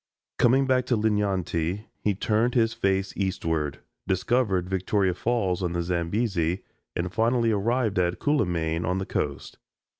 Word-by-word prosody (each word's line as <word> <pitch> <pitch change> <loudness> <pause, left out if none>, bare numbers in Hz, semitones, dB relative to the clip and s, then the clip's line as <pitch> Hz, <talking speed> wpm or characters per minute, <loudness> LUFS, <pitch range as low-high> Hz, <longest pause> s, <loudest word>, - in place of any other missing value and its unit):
Coming 130 +3 +4
back 130 -1 +2
to 120 - +2
Linyanti, 100 -3 0 0.2
he 105 -2 +1
turned 110 +5 +1
his 115 -2 +3
face 95 0 0
eastward, 80 -6 -2 0.3
discovered 95 -1 +1
Victoria 95 0 +1
Falls 95 -3 0
on 90 -2 -1
the 85 0 -1
Zambesi, 90 0 -1 0.3
and 90 +1 -2
finally 115 0 +2
arrived 110 0 +1
at 90 -1 +1
Cuilimane 85 - 0
on 90 +3 0
the 95 - -2
coast. - - -3
95 Hz, 140 wpm, -26 LUFS, 90-115 Hz, 0.3 s, Coming